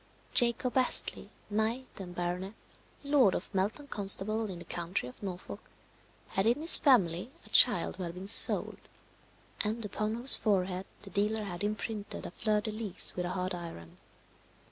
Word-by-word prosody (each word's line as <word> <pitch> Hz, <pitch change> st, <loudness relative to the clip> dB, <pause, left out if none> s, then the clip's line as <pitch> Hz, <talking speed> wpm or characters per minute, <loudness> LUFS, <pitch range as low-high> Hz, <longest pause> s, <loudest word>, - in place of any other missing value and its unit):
Jacob 240 Hz, 0 st, +2 dB
Astley, 255 Hz, -, -1 dB, 0.2 s
knight 220 Hz, +5 st, -2 dB
and 180 Hz, -2 st, -9 dB
baronet, 180 Hz, +4 st, -5 dB, 0.5 s
lord 280 Hz, -9 st, +2 dB
of 190 Hz, -, -7 dB
Melton 205 Hz, +9 st, -3 dB
Constable, 210 Hz, 0 st, -2 dB
in 185 Hz, -, -7 dB
the 170 Hz, -, -11 dB
county 170 Hz, -4 st, -5 dB
of 125 Hz, -, -13 dB
Norfolk, 190 Hz, +1 st, -9 dB, 0.6 s
had 195 Hz, +3 st, -1 dB
in 240 Hz, +4 st, +1 dB
his 325 Hz, +2 st, +10 dB
family 195 Hz, -, +1 dB, 0.2 s
a -, -, -15 dB
child -, -, +4 dB
who 185 Hz, -, -6 dB
had 170 Hz, 0 st, -8 dB
been 185 Hz, +2 st, -9 dB
sold, 220 Hz, -, +6 dB, 0.8 s
and 220 Hz, +1 st, -3 dB
upon 215 Hz, +2 st, -4 dB
whose 245 Hz, +3 st, +5 dB
forehead 190 Hz, -3 st, -2 dB, 0.2 s
the 195 Hz, -, -8 dB
dealer 210 Hz, +2 st, -2 dB
had 180 Hz, -2 st, -7 dB
imprinted 210 Hz, 0 st, -5 dB
a -, -, -8 dB
fleur 210 Hz, +2 st, -2 dB
de 215 Hz, -, -5 dB
lis 215 Hz, -3 st, 0 dB
with 180 Hz, -, -4 dB
a -, -, -4 dB
hot 185 Hz, 0 st, -4 dB
iron. 165 Hz, -, -10 dB
205 Hz, 165 wpm, -29 LUFS, 180-220 Hz, 0.8 s, his